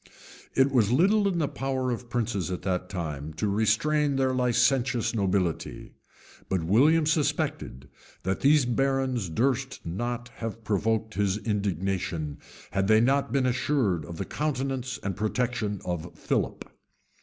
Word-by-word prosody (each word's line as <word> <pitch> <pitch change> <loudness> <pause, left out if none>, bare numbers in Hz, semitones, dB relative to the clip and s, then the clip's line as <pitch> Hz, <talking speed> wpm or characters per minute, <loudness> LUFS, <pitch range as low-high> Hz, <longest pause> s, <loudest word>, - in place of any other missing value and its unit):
{1087.} 135 - +6
It 140 - -4
was 115 -4 +3
little 200 - +4
in 175 - -2
the 155 -3 +1
power 135 -2 -2
of 120 0 -5
princes 110 -8 -1
at 90 - -4
that 90 -1 -1
time 80 -5 -5
to 105 +6 -1
restrain 135 +8 +2
their 130 -1 +1
licentious 125 -1 +2
nobility; 95 -5 -1 0.6
but 95 -3 0
William 145 - +4
suspected, 145 - -1 0.4
that 95 +1 -1
these 145 -1 +4
barons 130 -4 0
durst 130 +8 0
not 120 +8 -3
have 115 0 -5
provoked 110 +1 0
his 100 0 +1
indignation, 95 -7 -2 0.3
had 95 -1 0
they 110 +1 +6
not 135 +1 +2
been 135 0 +2
assured 125 - +1
of 85 -1 -8
the 100 - -3
countenance 135 -3 -2
and 100 -2 -2
protection 110 -1 -1
of 85 -1 -3
Philip. - - -2
115 Hz, 145 wpm, -27 LUFS, 95-135 Hz, 0.6 s, 1087